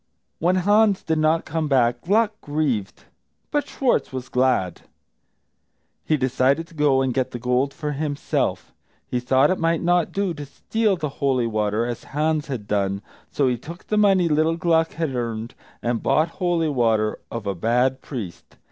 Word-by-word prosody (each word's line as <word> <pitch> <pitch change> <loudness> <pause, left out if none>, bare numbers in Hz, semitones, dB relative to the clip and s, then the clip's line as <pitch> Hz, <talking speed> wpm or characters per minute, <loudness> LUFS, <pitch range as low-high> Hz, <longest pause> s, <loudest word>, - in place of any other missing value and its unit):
When 175 +3 +2
Hans 205 +2 +3
did 160 -1 0
not 155 +1 +2
come 160 0 -2
back 120 -3 +2
Gluck 215 +4 +2
grieved, 145 -9 -2 0.5
but 290 -2 0
Schwartz 260 -3 0
was 130 -1 -6
glad. 125 -9 +1 1.2
He 155 - +1
decided 130 +4 +1
to - - -17
go 145 -4 +3
and 130 -2 0
get 130 +1 0
the - - -6
gold 125 +3 0
for 150 +1 -4
himself. 145 0 -2 0.3
He 125 - -2
thought 130 +4 +3
it 185 - -1
might 165 0 +1
not 175 -1 +2
do 195 -3 -1
to 150 -2 -7
steal 215 +7 0
the 155 -2 -2
holy 130 -3 +2
water, 110 0 0
as 120 -1 -5
Hans 155 +1 -1
had 120 -7 -5
done, 100 -1 -1 0.3
so 140 - +1
he 125 -2 0
took 170 +8 -10
the 215 - -1
money 195 -4 +4
little 160 +1 +2
Gluck 165 -2 +2
had 160 -4 -2
earned, 115 -2 -3 0.3
and 120 -1 -1
bought 160 +2 +2
holy 170 -2 0
water 115 -5 +1
of 115 -3 -6
a 100 - -1
bad 125 +7 +1
priest. 105 - -8
140 Hz, 175 wpm, -23 LUFS, 120-165 Hz, 1.2 s, money